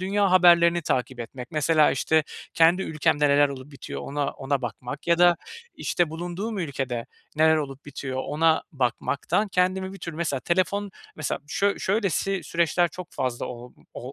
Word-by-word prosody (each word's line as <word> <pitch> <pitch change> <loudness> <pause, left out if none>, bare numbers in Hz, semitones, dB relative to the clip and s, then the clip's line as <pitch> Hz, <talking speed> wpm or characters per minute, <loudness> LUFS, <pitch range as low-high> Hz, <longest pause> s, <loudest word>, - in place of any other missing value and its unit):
dünya 195 +1 +1
haberlerini 175 -1 +5
takip 130 -3 -1
etmek, 125 +2 -8
mesela, 155 0 +3
işte, 155 +4 +2 0.3
kendi 170 +3 +4
ülkemde 150 -2 +1
neler 145 0 +5
olup 135 +1 -9
bitiyor 140 - -7
ona 145 0 -2
ona 135 -1 -2
bakmak 125 +5 -6
ya 170 0 +3
da, 175 -1 +6 0.4
işte, 175 -3 0
bulunduğum 175 +6 -4
ülkede 135 -8 -3 0.3
neler 160 0 +5
olup 140 -2 -5
bitiyor 130 -2 -5
ona 160 +1 +2
bakmaktan 140 - 0
kendimi 190 +1 0
bir 195 - -10
tür 170 -2 -6
Mesela 155 -4 -2
telefon 195 +5 0 0.3
Mesela 155 - -3
şöy 200 +6 0
şöylesi 195 -1 0
süreçler 170 +2 +1
çok 180 +2 -9
fazla 125 -2 -2
ol 125 0 -9
m - - -24
ol 130 +3 -7
160 Hz, 160 wpm, -25 LUFS, 140-180 Hz, 0.4 s, da